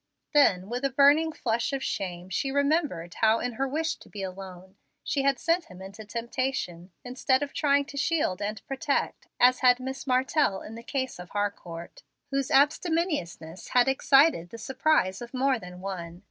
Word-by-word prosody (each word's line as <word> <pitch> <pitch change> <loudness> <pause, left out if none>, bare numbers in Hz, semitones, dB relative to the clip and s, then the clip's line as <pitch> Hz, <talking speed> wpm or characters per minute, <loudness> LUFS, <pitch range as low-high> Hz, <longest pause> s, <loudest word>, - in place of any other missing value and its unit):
Then 195 -11 +4
with 245 +4 -4
a. 275 - +2
burning 285 +4 +4
flush 235 -4 -1
of 270 -1 -2
shame 180 -2 -4
she 270 +9 -1
remembered 280 - 0
how, 220 +1 +3
in 245 +1 -2
her 270 +4 -1
wish 320 +4 -1
to - - -17
be 200 -2 -6
alone, 190 0 -9 0.3
she 280 - 0
had 275 -1 +2
sent 335 +1 +1
him 180 - -13
into 195 +3 -9
temptation, 230 -6 -3
instead 260 +2 +1
of 285 - -6
trying 285 -2 +2
to 280 - -10
shield 280 - 0
and 205 0 -4
protect, 275 +1 -2
as 250 +1 +5
had 250 -1 +5
Miss 265 +2 -6
Martell 255 -4 +1
in 215 - -9
the 230 - -8
case 260 -2 -3
of 180 0 -9
Harcourt, 185 -5 -5 0.3
whose 275 -1 -1
abstemiousness 290 - 0
had 245 - +6
excited 270 - +4
the 230 - -9
surprise 240 -5 +1
of 240 +2 -8
more 260 -1 +2
than 180 -2 -10
one. 175 -3 -6
250 Hz, 175 wpm, -27 LUFS, 190-275 Hz, 0.3 s, had